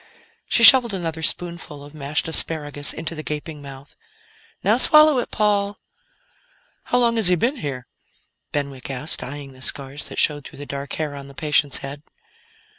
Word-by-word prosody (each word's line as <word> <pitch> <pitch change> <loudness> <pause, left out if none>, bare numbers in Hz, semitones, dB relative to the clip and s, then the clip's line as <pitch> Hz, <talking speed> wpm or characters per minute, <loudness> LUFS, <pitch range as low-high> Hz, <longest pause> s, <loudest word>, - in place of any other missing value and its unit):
She 235 - +2
shoveled 235 -4 +9
another 165 -3 -4
spoonful 170 -3 -2
of 145 +1 -13
mashed 150 +1 -2
asparagus 145 -3 -1
into 165 +1 -5
the 155 - -6
gaping 150 0 -6
mouth. 140 0 -12 0.7
"Now - - +3
swallow 305 -3 +6
it, - - -4
Paul." 205 -1 0 1.1
"How 245 - +1
long 235 -1 +2
has 220 -5 +4
he 180 - +5
been 245 - 0
here?" 135 - -5 0.7
Benwick 140 -3 -4
asked, 135 +3 +1
eyeing 140 +1 -8
the 130 0 -17
scars 140 +2 -6
that - - -9
showed 145 -1 +3
through 145 - -14
the 145 - -8
dark 140 0 -6
hair 155 -2 -3
on 140 -1 -9
the 140 - -14
patient's 145 -2 +1
head. 140 +1 -8
150 Hz, 170 wpm, -21 LUFS, 140-180 Hz, 1.1 s, shoveled